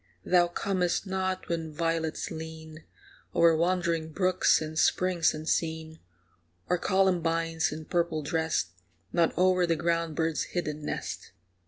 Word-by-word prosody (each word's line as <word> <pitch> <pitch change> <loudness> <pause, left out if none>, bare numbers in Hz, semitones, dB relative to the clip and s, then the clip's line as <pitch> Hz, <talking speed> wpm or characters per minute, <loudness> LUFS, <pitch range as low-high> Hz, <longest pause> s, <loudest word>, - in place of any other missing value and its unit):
Thou 175 -1 +4
comest 180 +1 -1
not 190 -1 -2
when 165 -2 -3
violets 165 0 -2
lean 160 -1 -8 0.5
O'er 165 -1 +5
wandering 170 -1 0
brooks 185 +2 +3
and 155 0 -4
springs 185 -3 +3
unseen, 160 0 -2 0.7
Or 180 0 +1
columbines, 165 -4 +1
in 155 +1 -7
purple 170 -3 0
dressed, 160 - 0 0.4
Nod 170 -1 +3
o'er 185 0 +3
the 165 - +2
ground 165 -1 -1
bird's 160 0 0 0.2
hidden 150 -3 -2
nest. - - -5
165 Hz, 125 wpm, -28 LUFS, 160-180 Hz, 0.7 s, O'er